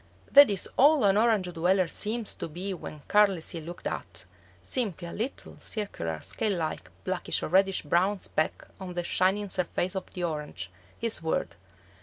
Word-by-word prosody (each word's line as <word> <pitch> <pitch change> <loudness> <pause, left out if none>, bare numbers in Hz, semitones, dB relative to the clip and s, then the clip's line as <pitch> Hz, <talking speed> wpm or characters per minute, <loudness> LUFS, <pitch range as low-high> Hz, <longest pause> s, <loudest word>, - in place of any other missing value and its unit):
That 285 0 +9
is 200 -2 +1
all 290 0 +6
an 195 -1 +5
Orange 210 -5 +2
dweller 180 +2 +2
seems 220 +5 -1
to - - -5
be 180 +5 -5
when 155 -4 -8
carelessly 195 -5 +2
looked 170 +3 -9
at; - - -4 0.4
simply 200 -9 -1
a - - -7
little 235 +6 -5
circular, 85 - -4
scale 210 -4 -1
like, 160 -2 -3
blackish 185 -1 -1
or - - -2
reddish 190 +2 +3
brown 180 +7 +2
speck 155 -4 -2
on 185 -2 -7
the 175 - -1
shining 195 +3 +1
surface 180 0 -1
of 190 - -4
the 180 - -4
orange, 150 - -4 0.3
his 230 -5 -1
world. 160 - -1
185 Hz, 165 wpm, -28 LUFS, 170-210 Hz, 0.4 s, That